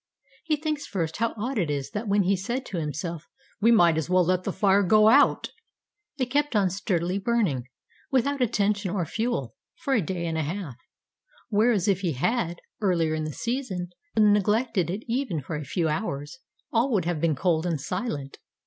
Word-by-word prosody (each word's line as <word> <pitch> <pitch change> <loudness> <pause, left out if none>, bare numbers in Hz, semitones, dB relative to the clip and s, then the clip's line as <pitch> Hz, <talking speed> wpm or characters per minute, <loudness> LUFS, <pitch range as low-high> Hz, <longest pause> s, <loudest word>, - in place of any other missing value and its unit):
He 315 -2 +1
thinks, 300 -1 -3
first, 165 -5 -2
how 230 +1 0
odd 240 +3 -2
it 170 -5 0
is 140 -2 -3
that 215 +2 -4
when 200 0 +3
he 195 +2 +2
said 240 +8 -3
to 185 - -4
himself, 155 +2 -4 0.3
"We 230 +3 +5
might 175 -8 +5
as 160 - -4
well 180 -1 +4
let 185 +1 +1
the - - 0
fire 195 0 +3
go 215 +3 +5
out," 285 +5 +4 0.7
it 260 - +1
kept 290 -2 +1
on 195 -3 +3
sturdily 185 -1 -1
burning, 195 - 0 0.4
without 275 +1 +1
attention 210 -4 +1
or 180 -2 -1
fuel, 220 - -2 0.2
for 275 - -2
a 230 - +3
day 175 0 -3
and 160 -1 -1
a - - +1
half; 160 -3 -4 0.7
whereas 215 -2 +2
if 195 -3 +3
he 175 -5 0
had, 175 - -1 0.2
earlier 170 -6 +2
in 155 0 -2
the 155 - -3
season, 230 - -3 0.3
neglected 210 -1 +3
it 200 +6 -3
even 240 - -1
for 145 +3 -5
a 150 - -4
few 165 +3 -1
hours, 150 - -3 0.3
all 235 +4 +3
would 185 -6 +1
have 170 -3 -1
been 165 -3 +2
cold 170 +2 +1
and 165 -4 -1
silent. 150 - -4
190 Hz, 190 wpm, -26 LUFS, 165-230 Hz, 0.7 s, We